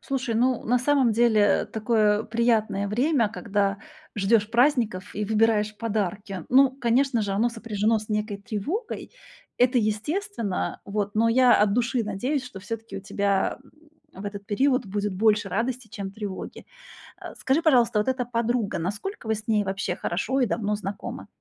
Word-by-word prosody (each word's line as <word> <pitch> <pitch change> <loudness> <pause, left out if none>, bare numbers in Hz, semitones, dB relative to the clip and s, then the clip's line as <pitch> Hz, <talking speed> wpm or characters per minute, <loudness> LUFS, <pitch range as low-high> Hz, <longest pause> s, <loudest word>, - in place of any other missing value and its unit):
Слушай, 260 -4 -2
ну 250 +1 +1
на 245 +2 +2
самом 260 -3 +3
деле 220 -3 +3
такое 215 -1 +1
приятное 220 -4 +1
время, 245 +1 +2
когда 200 -2 -1 0.4
ждёшь 210 +1 +2
праздников 235 -7 +1
и 210 - -2
выбираешь 215 -1 +2
подарки. 200 -4 -3
Ну, 265 +1 +6
конечно 260 -1 +1
же, 200 -1 -2
оно 225 +5 +2
сопряжено 225 -1 0
с 215 - -10
некой 210 -1 -2
тревогой. 245 - -4 0.5
Это 250 +1 +3
естественно, 225 - -2
вот, 205 0 -2
но 225 +2 +3
я 250 +1 +5
от 205 0 +3
души 240 0 +1
надеюсь, 250 +7 -2
что 195 -6 -9
всё-таки 225 +3 -6
у - - -5
тебя 200 +1 0 0.6
в 190 +2 -9
этот 200 0 -6
период 255 +3 +1
будет 205 0 -2
больше 210 +2 +2
радости, 240 -1 -2
чем 195 -1 -6
тревоги. 200 -2 -7 0.5
Э, - - -8
скажи, 280 +5 +1
пожалуйста, 240 -8 +4
вот 210 - +1
эта 255 -1 0
подруга, 235 -2 -1
насколько 205 - -5
вы 220 - +2
с 215 +2 -9
ней 210 -2 +2
вообще 195 -1 -2
хорошо 250 +10 -1
и 250 - +3
давно 210 0 -1
знакомы? 200 -1 -6
220 Hz, 160 wpm, -25 LUFS, 205-245 Hz, 0.6 s, Ну